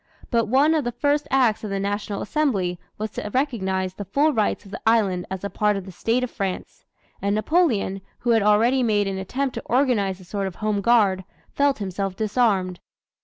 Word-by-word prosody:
But 230 -2 +2
one 275 +7 +4
of 310 -2 +1
the 240 - -2
first 290 +4 0
acts 250 -6 +2
of 215 - -4
the 195 0 -2
National 205 +1 -2
Assembly 200 - 0 0.2
was 215 0 -4
to 210 - -5
recognize 190 -9 0
the 205 - -6
full 290 - +2
rights 215 -1 0
of 195 - -13
the 220 - -7
island 205 -6 +2
as 190 0 -5
a 200 - -2
part 210 -1 +1
of 195 - -6
the 190 - -9
State 230 +7 0
of 250 - -3
France; 195 -3 -5 0.4
and 200 +1 +1
Napoleon, 215 - +1 0.2
who 240 - 0
had 225 -1 +4
already 225 +6 +3
made 210 -4 +2
an 190 -1 -3
attempt 260 +8 -2
to - - -6
organize 230 -7 +1
a - - -13
sort 200 +1 -3
of 185 - -7
Home 215 -2 -1
Guard, 200 -4 +3 0.3
felt 280 -1 +2
himself 195 -1 -3
disarmed. 200 -4 +1
210 Hz, 205 wpm, -23 LUFS, 195-245 Hz, 0.4 s, one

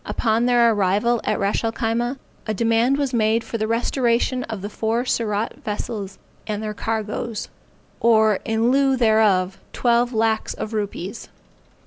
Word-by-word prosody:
Upon 230 +1 0
their 240 -2 +4
arrival 210 +4 +1
at - - 0
Ras 200 +3 0
el 225 - 0
Khyma, 235 +4 -1 0.3
a 215 - -1
demand 230 +5 +2
was 280 -3 -1
made 225 0 +2
for 230 0 -5
the 215 - 0
restoration 240 +2 +1
of 210 -4 -6
the - - -2
four 225 +3 -1
Surat 220 -3 -1
vessels 205 -2 -4 0.3
and 210 0 -3
their 215 -1 -3
cargoes; 220 0 -3 0.5
or 220 -3 +4
in 225 +2 +1
lieu 270 0 +3
thereof 215 -5 +3
twelve 240 0 +2
lacks 220 -1 0
of 215 - -5
rupees. 205 -1 -4
225 Hz, 150 wpm, -22 LUFS, 215-235 Hz, 0.5 s, their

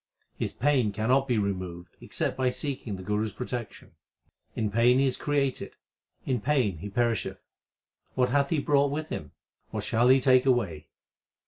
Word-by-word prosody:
His - - -3
pain 130 -5 +1
cannot 125 +7 +1
be 120 -3 +1
removed 90 -4 -3
except - - -2
by 130 -1 +1
seeking 125 -6 -4
the 95 - -8
Guru 105 +2 0
s - - -7
protection. 125 -2 -6 0.6
In 110 -2 -1
pain 120 +3 +4
he 135 - +3
is 130 - +1
created, 140 -2 -1 0.5
in 125 -4 -1
pain 120 - +1
he 105 - -6
perisheth. 115 +2 -1 0.7
What 125 -1 +2
hath 140 +1 +2
he 165 - +1
brought 145 -1 +2
with 155 +2 -4
him? 75 -2 -6 0.4
what - - -4
shall 120 +2 +2
he 130 +1 +7
take 130 0 +4
away 100 - 0
125 Hz, 165 wpm, -27 LUFS, 105-135 Hz, 0.7 s, he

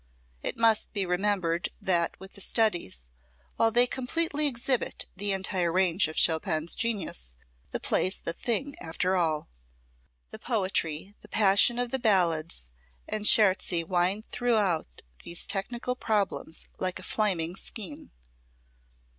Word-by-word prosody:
It - - -2
must 225 -1 +3
be 200 -2 0
remembered 180 -2 0
that 170 -3 0
with 190 0 -12
the 200 - -10
studies, 175 - +1 0.6
while 225 - +4
they 240 +2 +4
completely 295 +4 0
exhibit 255 -1 -1
the 200 +1 0
entire 190 -3 0
range 180 -1 +3
of 155 - -7
Chopin's 160 0 +2
genius, 185 - -2 0.4
the - - -4
play's 185 +1 +1
the 170 - -2
thing 245 +9 -2
after 180 +3 -1
all. 160 -4 0 0.8
The - - -9
poetry, 190 -5 -1
the - - -15
passion 210 +3 +4
of 245 -1 -1
the 265 - -1
Ballades 170 - +1 0.4
and 210 0 +1
Scherzi 185 -4 +4
wind 185 +5 0
throughout 205 - 0 0.2
these 170 - -2
technical 235 +5 -2
problems 205 -8 -2
like 185 -1 -1
a - - -9
flaming 180 -6 0
skein. 190 -7 -7
190 Hz, 130 wpm, -28 LUFS, 170-225 Hz, 0.8 s, while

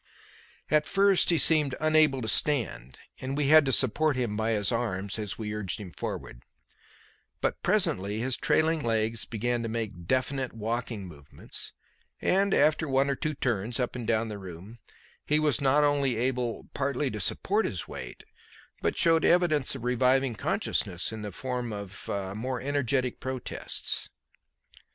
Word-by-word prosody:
At 150 0 +3
first 195 -1 +4
he 170 - +4
seemed 150 -4 +6
unable 155 -4 +3
to - - -4
stand, 110 - 0 0.2
and 135 +2 -4
we 145 -2 +1
had 155 -1 +7
to - - +2
support 140 +4 +3
him 120 -5 -1
by 110 +1 0
his 105 -1 0
arms 100 -4 -2
as 105 -3 -4
we 105 -2 -4
urged 105 -3 -3
him 95 -4 -8
forward; - - -6 1.0
but - - -1
presently 100 +3 +1
his 125 +3 0
trailing 160 0 +1
legs 110 -2 0
began 120 +2 -2
to 115 - -3
make 110 -7 -5
definite 130 +1 -1
walking 115 -1 -3
movements, 75 -5 -7 0.5
and, 195 +1 +2
after 155 +1 +3
one 135 +1 +2
or - - -1
two 155 0 -3
turns 120 -2 -1
up 125 0 -2
and 120 -3 -5
down 115 0 +1
the 105 -2 -6
room, 95 +5 -10 0.4
he 150 - +2
was 150 -5 +1
not 140 +2 +3
only 140 -3 +2
able 125 -1 -2
partly 140 0 -1
to 105 - -5
support 205 - +1
his 90 - -3
weight, - - -8 0.6
but - - -1
showed 165 -1 +4
evidence 155 -7 +3
of 130 - -8
reviving 125 +1 +2
consciousness 90 -3 -1
in 110 -1 -6 1.1
more 125 +3 -3
energetic 130 -2 -1
protests. 130 -1 -3
125 Hz, 150 wpm, -28 LUFS, 110-145 Hz, 1.1 s, had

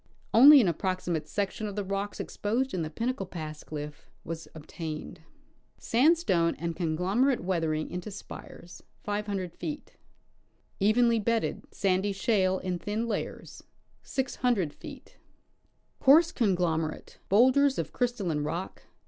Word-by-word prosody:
Only 280 +5 +10
an 225 - +3
approximate 175 -2 -2
section 205 +4 -2
of 200 - -6
the 205 - -2
rocks 195 +1 -3
exj^osed 240 +6 -2
in 180 - -1
the 155 - -3
Pin 230 +10 -2
nacle 195 -7 -6
pass 155 -4 -7
cliff 150 0 -8
was 165 -1 -6
obtained. 160 +1 -7 0.6
Sandstone 240 - +2
and 170 0 -4
conglomerate 190 - +1
weathering 165 -4 -1
into 180 +3 -5
spires. 185 -3 -10 2.0
Evenly 230 +3 +4
bedded, 230 +2 -1
sandy 195 +1 0
shale 190 -2 +1
in 185 -1 -3
thin 215 +5 -2
layers 215 -3 -5 2.4
Coarse 315 +5 +6
conglomerate; 175 - -1
bowlders 260 +6 +4
of - - -3
crystalline 205 - -1
rock 170 +5 -5
190 Hz, 110 wpm, -28 LUFS, 165-230 Hz, 2.4 s, Only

